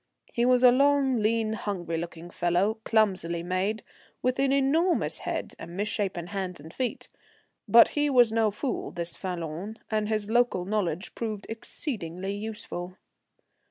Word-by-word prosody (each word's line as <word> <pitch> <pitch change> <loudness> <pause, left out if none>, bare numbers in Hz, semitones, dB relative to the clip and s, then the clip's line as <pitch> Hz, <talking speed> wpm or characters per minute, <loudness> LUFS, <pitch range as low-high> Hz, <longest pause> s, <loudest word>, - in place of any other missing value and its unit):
He 235 - +2
was 250 0 +4
a 250 - +9
long, 275 0 +3
lean, 220 0 +1
hungry 185 -6 -3
looking 170 0 -7
fellow, 180 +7 +1
clumsily 185 -6 +2
made, 185 +5 -1 0.4
with 255 +1 +1
an 275 0 +3
enormous 295 +6 +2
head - - -3
and 170 +2 -8
misshapen 200 -4 -2
hands 185 -1 -4
and 160 +3 -12
feet; 255 -2 -3 0.6
but 235 0 +8
he 295 0 +1
was 245 -4 +5
no 225 -1 +3
fool 245 +6 -3
this 170 -1 -2
Falloon, 180 +3 -5
and 215 -1 0
his 215 -2 0
local 235 -5 +2
knowledge 190 -3 -2
proved 215 -3 -4
exceedingly 200 - -5
useful. 200 -4 -6
210 Hz, 145 wpm, -27 LUFS, 180-240 Hz, 0.6 s, a